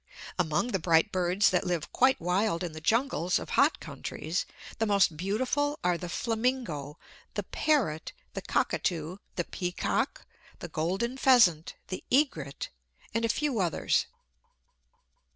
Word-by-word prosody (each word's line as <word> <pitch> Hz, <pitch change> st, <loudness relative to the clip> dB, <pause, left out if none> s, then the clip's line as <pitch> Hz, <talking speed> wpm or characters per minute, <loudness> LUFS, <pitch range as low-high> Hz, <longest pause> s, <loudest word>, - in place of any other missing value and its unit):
Among 160 Hz, +7 st, +1 dB
the 195 Hz, -, 0 dB
bright 165 Hz, +4 st, +3 dB
birds 185 Hz, +2 st, +2 dB
that 180 Hz, -, +2 dB
live 175 Hz, -3 st, -2 dB
quite 260 Hz, +1 st, +4 dB
wild 180 Hz, +1 st, 0 dB
in 175 Hz, -, -3 dB
the 155 Hz, 0 st, -9 dB
jungles 185 Hz, -, +1 dB
of -, -, -6 dB
hot -, -, +3 dB
countries, 165 Hz, +4 st, -4 dB, 0.3 s
the 225 Hz, -, +1 dB
most 200 Hz, -5 st, +3 dB
beautiful 255 Hz, -, 0 dB
are 180 Hz, 0 st, +3 dB
the 175 Hz, 0 st, -6 dB
flamingo, 225 Hz, -, -2 dB, 0.4 s
the -, -, -1 dB
parrot, 230 Hz, -, 0 dB, 0.2 s
the -, -, -4 dB
cockatoo, 170 Hz, +1 st, -1 dB, 0.2 s
the 175 Hz, -, 0 dB
peacock, 180 Hz, +1 st, -2 dB, 0.3 s
the -, -, -7 dB
golden 190 Hz, +11 st, -1 dB
pheasant, 225 Hz, -, +4 dB
the 185 Hz, -, -5 dB
egret, 205 Hz, -, +1 dB, 0.4 s
and 230 Hz, +1 st, +1 dB
a -, -, 0 dB
few 280 Hz, -1 st, 0 dB
others. 175 Hz, -4 st, +1 dB
185 Hz, 135 wpm, -29 LUFS, 165-235 Hz, 0.4 s, quite